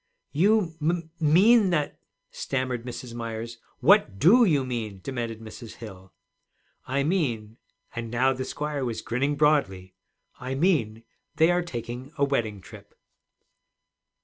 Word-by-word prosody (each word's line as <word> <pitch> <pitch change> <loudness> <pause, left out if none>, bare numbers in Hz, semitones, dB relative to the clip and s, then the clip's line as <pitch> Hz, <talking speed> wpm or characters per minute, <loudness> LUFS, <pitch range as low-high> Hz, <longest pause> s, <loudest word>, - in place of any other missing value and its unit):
'You 190 +1 +2
m 155 - +2
m 170 -2 -3
mean 190 +8 +5
that 150 -5 -1 0.2
' - - -50
stammered 130 -2 -2
Mrs. 125 0 -7
Myers. 115 0 -6 0.2
'What 160 - +4
do 225 - +6
you 145 -8 +2
mean?' 110 -6 -4
demanded 120 -4 -4
Mrs. 110 +1 -10
Hill. 95 -4 -11 0.8
'I 140 +2 0
mean,' 120 - -1 0.4
and 115 -1 -4
now 130 +3 +2
the 130 0 -4
squire 145 +1 -3
was 120 -3 -3
grinning 130 +4 -1
broadly, 135 -12 +1 0.5
'I 130 +1 -4
mean 135 - +1 0.3
they 160 +3 +4
are 175 0 +2
taking 125 -4 -6
a 140 - +1
wedding 110 -8 -1
trip.' - - -14
130 Hz, 140 wpm, -26 LUFS, 115-155 Hz, 0.8 s, do